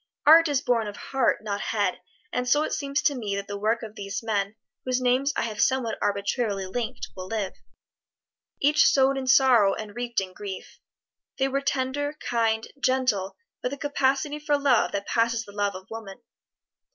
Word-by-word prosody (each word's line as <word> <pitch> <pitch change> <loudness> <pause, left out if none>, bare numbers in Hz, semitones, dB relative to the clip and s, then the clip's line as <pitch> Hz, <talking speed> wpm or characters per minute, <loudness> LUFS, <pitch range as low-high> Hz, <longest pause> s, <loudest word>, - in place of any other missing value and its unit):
Art 330 +2 +8
is 285 -3 +1
born 230 -3 +1
of 205 - -7
heart, 265 -5 0
not 205 -1 -3
head; 205 -4 -1 0.3
and 250 0 -1
so 295 +3 +4
it - - -3
seems 280 0 -1
to 290 - +3
me 215 -7 -3
that 200 0 -4
the 205 - -5
work 220 +3 0
of 215 -2 -7
these 200 +1 -5
men 205 -2 -1 0.3
whose 255 0 0
names 255 +3 +2
I - - +1
have 215 -2 -3
somewhat 260 -4 +1
arbitrarily 200 0 -1
linked, 235 +5 -4
will 185 -1 -7
live. 210 -2 -2 1.1
Each 295 +2 +5
sowed 270 0 +4
in 265 -1 -4
sorrow 255 -7 +5
and 210 -2 -8
reaped 240 -1 -1
in 190 -1 -5
grief. 195 -2 -8 0.6
They 270 - +2
were 275 +1 -1
tender, 280 +2 -1
kind, 225 -1 0
gentle, 255 -8 0 0.2
with 250 - -2
a - - -5
capacity 285 +1 0
for 295 -1 +1
love 275 -5 +3
that 200 0 -2
passes 230 -1 +1
the 205 - -12
love 205 -1 -1
of 185 0 -9
woman. 220 -3 -8
235 Hz, 185 wpm, -26 LUFS, 205-270 Hz, 1.1 s, Art